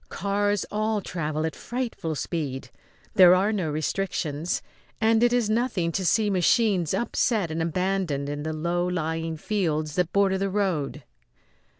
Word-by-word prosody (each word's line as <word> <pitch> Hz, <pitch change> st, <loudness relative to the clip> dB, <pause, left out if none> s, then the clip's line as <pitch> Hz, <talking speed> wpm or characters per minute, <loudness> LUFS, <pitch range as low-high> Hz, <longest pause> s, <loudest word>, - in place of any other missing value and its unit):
Cars 205 Hz, 0 st, 0 dB
all 215 Hz, 0 st, 0 dB
travel 155 Hz, -5 st, -3 dB
at 160 Hz, -, -3 dB
frightful 235 Hz, -10 st, -4 dB
speed. 135 Hz, -5 st, -4 dB, 0.4 s
There 185 Hz, -4 st, +8 dB
are 200 Hz, +4 st, +2 dB
no 185 Hz, -7 st, -1 dB
restrictions, 155 Hz, 0 st, -2 dB, 0.4 s
and 225 Hz, 0 st, +3 dB
it 240 Hz, 0 st, +4 dB
is 245 Hz, -3 st, +2 dB
nothing 215 Hz, -6 st, 0 dB
to 190 Hz, +3 st, -2 dB
see 210 Hz, +4 st, +3 dB
machines 185 Hz, -2 st, +2 dB
upset 215 Hz, -4 st, 0 dB
and 160 Hz, +1 st, -2 dB
abandoned 170 Hz, -4 st, -1 dB
in 145 Hz, 0 st, -4 dB
the 155 Hz, +1 st, -3 dB
low 170 Hz, +3 st, -1 dB
lying 165 Hz, -2 st, -2 dB
fields 155 Hz, -5 st, -1 dB
that 180 Hz, -2 st, +1 dB
border 195 Hz, -1 st, +2 dB
the 195 Hz, 0 st, 0 dB
road. 175 Hz, -8 st, -1 dB
180 Hz, 150 wpm, -25 LUFS, 160-205 Hz, 0.4 s, There